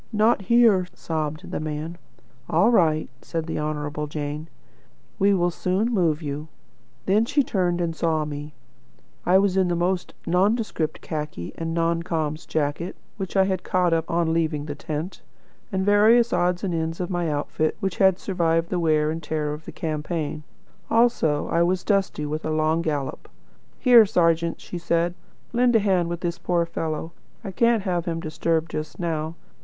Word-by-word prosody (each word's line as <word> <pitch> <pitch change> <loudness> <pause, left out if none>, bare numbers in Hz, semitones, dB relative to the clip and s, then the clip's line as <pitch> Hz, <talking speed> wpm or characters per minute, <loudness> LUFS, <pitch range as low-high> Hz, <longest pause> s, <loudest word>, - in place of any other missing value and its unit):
'Not 215 0 +3
here,' 210 -3 +4
sobbed 155 +1 -4
the - - -2
man. 155 +2 -4 0.5
'All 235 - +4
right,' 155 - +2
said 165 -2 -4
the 165 - -3
Honourable 150 0 -3
Jane; 150 +1 -4 0.7
'we 200 +1 +4
will 175 -1 +1
soon 190 +7 0
move 165 -6 +1
you.' 145 +1 -4 0.6
Then 205 +3 +3
she 285 +3 +2
turned 180 -6 0
and 170 -2 -1
saw 160 -2 0
me. 150 0 -7 0.7
I 180 +2 +6
was 195 -1 +2
in 190 -1 +3
the 175 - 0
most 180 +1 -1
nondescript 190 -2 0
khaki, 150 - -5
a 165 - -5
non 165 0 0
com's 160 -3 -3
jacket 155 +4 -2 0.2
which 195 -1 -4
I 190 - +6
had 190 -1 -1
caught 180 -2 +1
up 165 0 0
on 165 -1 +1
leaving 155 -3 0
the 145 - -4
tent, 155 +4 -5 0.5
and 190 -1 0
various 220 +4 +5
odds 180 +1 +1
and 185 -3 -1
ends 165 0 -2
of 180 +1 -3
my 175 -2 0
outfit 150 +1 -1
which 195 -4 -2
had 190 -2 +4
survived 170 -4 0
the 180 - 0
wear 155 -2 +2
and 165 +1 -4
tear 150 -1 -2
of 150 +1 -9
the - - -7
campaign. 155 -1 -3 0.5
Also 225 -11 +2
I 170 - +2
was 180 +1 +1
dusty 195 -7 0
with 155 +2 -3
a - - -2
long 155 +1 +1
gallop. 145 -5 -3 0.5
'Here, 240 -4 +7
serjeant,' 165 -2 +1
she 175 - -6
said, 170 0 +1 0.4
'lend 245 0 +3
a - - +7
hand 185 -4 +1
with 170 0 -4
this 170 -1 -2
poor 175 -1 +1
fellow. 160 -1 -4 0.3
I 195 - -5
can't 230 +1 +2
have 180 -3 -1
him 165 -2 -2
disturbed 160 0 -1
just 155 0 -5
now.' 160 -2 -2
170 Hz, 175 wpm, -24 LUFS, 155-190 Hz, 0.7 s, Here